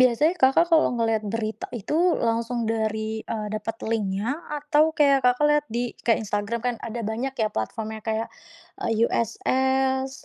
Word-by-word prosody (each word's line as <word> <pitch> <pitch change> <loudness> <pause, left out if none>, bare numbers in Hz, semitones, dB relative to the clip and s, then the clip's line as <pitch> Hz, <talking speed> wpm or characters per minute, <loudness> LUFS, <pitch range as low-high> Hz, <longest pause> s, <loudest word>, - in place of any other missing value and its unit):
Biasanya 255 +7 +4
Kakak 270 +6 +6
kalau 320 - +5
ngelihat 225 -2 +1
berita 220 -1 -3
itu 205 - -4 0.3
langsung 230 +1 -1
dari, 220 -1 -1 0.3
eee, 215 -2 -3
dapet 215 +1 -4
link-nya 205 -1 -1 0.3
atau 295 +1 +3
kayak 280 -2 +5
Kakak 250 +4 +4
lihat 295 0 +3
di 240 - +1 0.4
Instagram, 205 +2 -2
kan 245 - +1
ada 235 +1 -4
banyak 260 +4 -3
ya, 215 - +2
platform-nya 220 - -3
kayak 220 +1 -1 0.8
USS, 265 +3 0
230 Hz, 140 wpm, -25 LUFS, 220-265 Hz, 0.8 s, Kakak